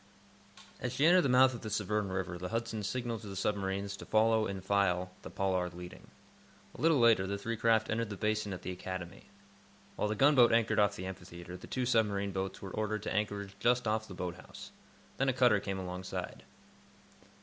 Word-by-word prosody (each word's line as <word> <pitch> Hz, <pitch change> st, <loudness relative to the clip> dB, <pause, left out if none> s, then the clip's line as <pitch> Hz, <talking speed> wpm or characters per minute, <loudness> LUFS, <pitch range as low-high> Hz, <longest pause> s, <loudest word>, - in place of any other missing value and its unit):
As 125 Hz, -1 st, -3 dB
she 135 Hz, +4 st, +2 dB
entered 180 Hz, +2 st, +7 dB
the 140 Hz, -, +1 dB
mouth 130 Hz, +1 st, +6 dB
of 120 Hz, -, -7 dB
the 110 Hz, -, -5 dB
Severn 105 Hz, -1 st, -1 dB
River 95 Hz, -2 st, -3 dB
the 90 Hz, +1 st, -4 dB
"Hudson" 115 Hz, -1 st, -2 dB
signaled 115 Hz, +2 st, -3 dB
to 105 Hz, -, -9 dB
the 100 Hz, -, -7 dB
submarines 100 Hz, 0 st, -1 dB
to -, -, -9 dB
follow, 110 Hz, 0 st, +3 dB
in 100 Hz, -1 st, -4 dB
file, 90 Hz, -2 st, +1 dB
the -, -, -8 dB
"Pollard" 90 Hz, -2 st, -1 dB
leading. 90 Hz, 0 st, -10 dB, 0.7 s
A -, -, -9 dB
little 160 Hz, 0 st, +4 dB
later 115 Hz, -6 st, +4 dB
the 100 Hz, +1 st, -2 dB
three 115 Hz, +3 st, -3 dB
craft 110 Hz, 0 st, +2 dB
entered 115 Hz, -1 st, -1 dB
the 100 Hz, -, -6 dB
Basin 105 Hz, -1 st, -1 dB
at 90 Hz, -, -6 dB
the 90 Hz, -, -3 dB
Academy. 90 Hz, 0 st, -7 dB, 0.7 s
While -, -, 0 dB
the 105 Hz, -, -1 dB
gunboat 135 Hz, 0 st, +6 dB
anchored 115 Hz, -2 st, +3 dB
off 100 Hz, -1 st, +3 dB
the 95 Hz, -, -6 dB
Amphitheatre, 90 Hz, -1 st, -8 dB
the -, -, -10 dB
two 130 Hz, -1 st, -2 dB
submarine 105 Hz, -5 st, +1 dB
boats 95 Hz, +1 st, -4 dB
were 95 Hz, -, -6 dB
ordered 110 Hz, 0 st, -2 dB
to -, -, -3 dB
anchorage 100 Hz, -1 st, -2 dB
just 120 Hz, +2 st, +2 dB
off 110 Hz, 0 st, 0 dB
the 95 Hz, -, -9 dB
Boat 90 Hz, -1 st, -4 dB
House. -, -, -11 dB, 0.5 s
Then 135 Hz, 0 st, +2 dB
a -, -, +2 dB
cutter 125 Hz, -4 st, +4 dB
came 95 Hz, -1 st, -4 dB
alongside. 90 Hz, 0 st, -5 dB
105 Hz, 205 wpm, -32 LUFS, 95-115 Hz, 0.7 s, entered